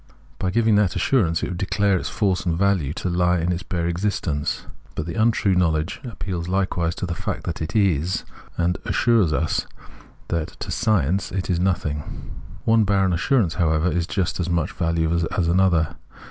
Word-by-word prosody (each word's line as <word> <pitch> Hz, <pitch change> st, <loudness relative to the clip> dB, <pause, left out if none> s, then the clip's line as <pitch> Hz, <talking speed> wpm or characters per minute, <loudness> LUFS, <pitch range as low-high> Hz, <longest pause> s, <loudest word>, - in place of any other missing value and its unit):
By 95 Hz, -, 0 dB
giviag 110 Hz, +1 st, +3 dB
that 100 Hz, -3 st, +2 dB
assur 125 Hz, -10 st, +2 dB
ance 80 Hz, 0 st, -1 dB
it -, -, -1 dB
would 90 Hz, -1 st, -5 dB
declare 100 Hz, 0 st, +1 dB
its 90 Hz, -, -2 dB
force 95 Hz, -4 st, 0 dB
and 85 Hz, -3 st, 0 dB
value 95 Hz, -7 st, +2 dB
to -, -, -3 dB
he 90 Hz, 0 st, +2 dB
in 90 Hz, -, +1 dB
its 90 Hz, 0 st, -2 dB
bare 85 Hz, -2 st, -2 dB
existence; 85 Hz, -4 st, -1 dB, 0.3 s
but 75 Hz, -, -3 dB
the 85 Hz, -, -4 dB
untrue 110 Hz, -2 st, +2 dB
knowledge 80 Hz, -1 st, 0 dB
appeals 95 Hz, -8 st, -5 dB
hkewise 90 Hz, -3 st, 0 dB
to -, -, -3 dB
the 85 Hz, -, -3 dB
fact -, -, -4 dB
that 85 Hz, -, -4 dB
it 80 Hz, +4 st, -4 dB
is, 95 Hz, -4 st, +2 dB, 0.3 s
and 85 Hz, +1 st, +1 dB
assures 115 Hz, -9 st, +2 dB
us 70 Hz, -, 0 dB, 0.6 s
that 80 Hz, -2 st, -2 dB
to -, -, -5 dB
it -, -, -1 dB
science 95 Hz, -2 st, +1 dB
is 90 Hz, -1 st, -1 dB
nothing. 80 Hz, -6 st, -2 dB, 0.3 s
One 115 Hz, 0 st, +4 dB
barren 95 Hz, -2 st, +2 dB
assurance, 95 Hz, -, +2 dB
how 85 Hz, -3 st, +1 dB
ever, 80 Hz, +3 st, +1 dB
is 85 Hz, -1 st, 0 dB
of -, -, -21 dB
just 95 Hz, -3 st, -1 dB
as 90 Hz, 0 st, -1 dB
much 85 Hz, -3 st, 0 dB
value 85 Hz, -1 st, 0 dB
as 85 Hz, +1 st, 0 dB
another. 85 Hz, -2 st, +2 dB
90 Hz, 190 wpm, -23 LUFS, 85-95 Hz, 0.6 s, One